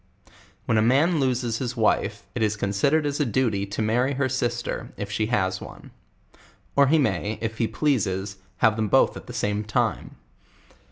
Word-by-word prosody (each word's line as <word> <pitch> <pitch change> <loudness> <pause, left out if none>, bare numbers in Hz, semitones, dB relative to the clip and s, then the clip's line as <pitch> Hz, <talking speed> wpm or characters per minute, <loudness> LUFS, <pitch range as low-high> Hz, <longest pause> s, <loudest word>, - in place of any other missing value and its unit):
When 115 - +2
a - - +3
man 145 +9 +3
loses 125 -4 0
his 125 -1 -4
wife, 110 -2 +1
it - - -3
is 105 -1 +1
considered 105 +10 +1
as 145 0 -2
a - - +3
.duty 110 -5 0
to 100 +2 -3
marry 125 +5 +1
her 135 0 +1
sister, 120 -3 -2
if 100 0 -5
she 110 +1 0
has 95 -5 0
one; - - -11 0.8
or 140 0 +5
he 160 +4 +4
may, 105 - 0
if 110 0 -4
he 115 - +2
pie. 150 +3 +1 0.6
have 110 0 +3
them 110 -1 0
both - - +3
at - - -10
the - - -7
same 105 +1 -1
time. 105 0 -1
115 Hz, 180 wpm, -24 LUFS, 105-130 Hz, 0.8 s, or